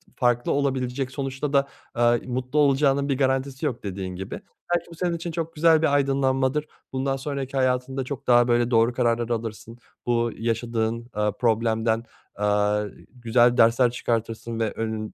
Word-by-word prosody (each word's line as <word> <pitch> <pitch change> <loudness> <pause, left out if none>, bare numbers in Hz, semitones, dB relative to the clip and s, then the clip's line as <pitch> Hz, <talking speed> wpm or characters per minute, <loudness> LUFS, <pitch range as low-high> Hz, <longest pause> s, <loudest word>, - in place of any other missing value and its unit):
farklı 120 -1 +1
olabilecek 130 -1 -1
sonuçta 135 +1 -3
da, 140 0 +3 0.3
aaa, 120 0 +4
mutlu 130 +3 -1
olacağının 140 0 +3
bir 135 - +1
garantisi 135 0 0
yok, 120 -3 -2
dediğin 95 -2 -5
gibi. 95 +1 -6 0.3
Belki 170 0 -3
bu 170 - -10
senin 175 0 -1
için 170 +1 -5
çok 165 0 -4
güzel 160 0 +5
bir 150 -3 +2
aydınlanmadır, 135 +1 +1 0.3
bundan 135 +1 0
sonraki 135 -1 -4
hayatında 130 +1 0
çok 140 +1 -7
daha, 120 0 +5
böyle, 120 0 +2
doğru 115 +1 +4
kararlar 120 -1 +1
alırsın, 115 0 -4 0.3
bu 120 -1 +1
yaşadığın, 115 0 -2
aaa, 105 0 0
problemden, 115 0 +1 0.3
aaa, 105 0 +1 0.3
güzel 120 0 +3
dersler 120 +2 +5
çıkartırsın 115 -1 -3
ve 110 -2 0
önün 110 -1 -4
125 Hz, 155 wpm, -24 LUFS, 115-135 Hz, 0.3 s, güzel